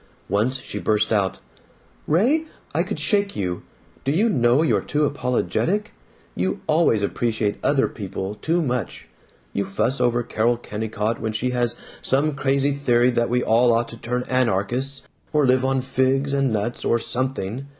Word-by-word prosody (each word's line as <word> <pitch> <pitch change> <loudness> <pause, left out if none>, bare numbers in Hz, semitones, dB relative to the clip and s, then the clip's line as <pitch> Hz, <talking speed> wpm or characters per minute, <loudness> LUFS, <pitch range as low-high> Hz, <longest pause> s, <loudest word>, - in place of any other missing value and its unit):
Once 115 +7 +1
she - - -6
burst 110 +1 +1
out: 100 -3 +1 0.7
"Ray, 250 - +3 0.3
I - - +2
could - - -3
shake 200 -2 +1
you! 90 -3 -2 0.4
Do 135 - +1
you 205 +10 +3
know 125 - +3
you're 160 - +2
too 150 0 0
apologetic? 145 +9 -1 0.4
You 90 +2 -1
always 155 -9 +3
appreciate 110 -1 -1
other 140 -1 +3
people 95 -1 -5
too 165 +11 0
much. 125 - -3 0.5
You 100 - 0
fuss 110 +7 -1
over 120 0 +2
Carol 115 +2 +1
Kennicott 110 0 -3
when 110 -1 -2
she 125 +3 -1
has 120 -1 +1 0.3
some 145 +3 +1
crazy 140 +1 +1
theory 125 -3 +2
that 120 -1 0
we 125 +1 +1
all 120 +2 +4
ought 115 +1 +1
to 115 - -9
turn 125 +2 -2
anarchists 130 +3 0 0.3
or 150 -2 +4
live 130 0 +3
on 135 0 +1
figs 130 +2 +1
and 135 -2 +2
nuts 110 +3 -2
or 115 - +2
something. 130 0 -3
125 Hz, 160 wpm, -23 LUFS, 110-140 Hz, 0.7 s, all